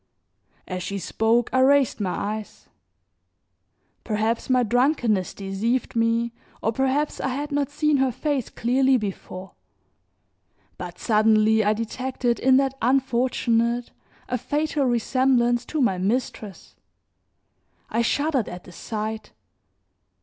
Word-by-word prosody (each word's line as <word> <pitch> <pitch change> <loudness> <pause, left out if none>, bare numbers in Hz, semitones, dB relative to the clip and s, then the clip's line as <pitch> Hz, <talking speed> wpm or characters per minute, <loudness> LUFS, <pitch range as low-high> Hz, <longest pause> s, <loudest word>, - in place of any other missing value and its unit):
As 185 -1 -4
she 200 +2 -4
spoke 225 +4 +1
I 260 - +3
raised 270 -1 +4
my 195 -3 -1
eyes. 215 +1 -5 1.3
Perhaps 220 +2 -1
my 255 -1 +4
drunkenness 240 - +1
deceived 205 +7 -2
me, 230 +1 +1 0.3
or 225 - 0
perhaps 270 +5 0
I - - -1
had 285 +3 -3
not 285 -2 0
seen 300 0 +1
her 265 -1 +2
face 265 0 -2
clearly 260 +2 +2
before, 190 -3 -6 1.3
but - - -7
suddenly 220 0 +3
I 210 +1 +3
detected 240 +2 -2
in 260 0 +5
that 270 -1 +1
unfortunate 240 -2 +1 0.4
a 250 -1 -2
fatal 295 +2 -1
resemblance 240 0 +2
to 310 - -3
my 195 -9 +2
mistress. 210 -2 -3 1.2
I 230 - +1
shuddered 280 0 0
at 180 0 -8
the - - -13
sight. 215 +4 -5
240 Hz, 120 wpm, -24 LUFS, 215-265 Hz, 1.3 s, in